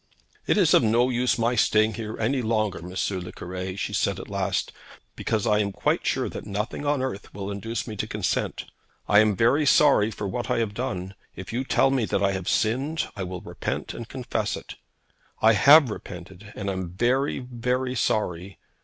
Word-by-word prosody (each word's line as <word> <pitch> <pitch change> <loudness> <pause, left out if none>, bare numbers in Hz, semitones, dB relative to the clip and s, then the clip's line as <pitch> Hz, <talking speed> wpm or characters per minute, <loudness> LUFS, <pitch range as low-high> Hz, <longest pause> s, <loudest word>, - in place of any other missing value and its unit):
'It - - +3
is 180 -7 +4
of - - +7
no 120 +2 +3
use 125 0 +1
my 115 +1 +1
staying 110 -1 +3
here 110 +1 -5
any 125 +4 +1
longer, 110 -4 0
M. 90 +2 -9 0.2
le 90 0 -7
Cure,' 90 +1 -6
she - - -3
said - - 0
at - - -9
last, - - -1 0.4
'because 110 -2 -1
I 105 -1 +3
am 100 -1 0
quite - - 0
sure - - 0
that - - -7
nothing 105 +8 -3
on 145 -2 +1
earth 120 -6 -5
will 100 0 -4
induce 105 +3 -4
me 110 - -6
to 110 - -2
consent. 105 -4 -2 0.4
I 105 - +6
am 105 -1 +4
very 120 +9 +3
sorry 140 -7 +5
for 105 -2 -5
what 120 +6 -4
I - - +1
have 110 -3 -1
done. 95 -5 -4 0.2
If 95 +3 -8
you 125 +3 -1
tell 135 0 +3
me 130 -4 +1
that - - 0
I 100 - +3
have 95 -2 -3
sinned, 135 +8 0
I 100 - -5
will 90 -1 -5
repent - - -4
and - - -8
confess - - -2
it. - - -9 0.7
I 110 +1 +5
have 140 +5 +7
repented, 95 +1 -9
and 100 - -5
am 95 -2 -3
very, 125 +9 +1
very 125 +1 -2
sorry. 100 -7 -1
110 Hz, 200 wpm, -25 LUFS, 100-125 Hz, 0.7 s, of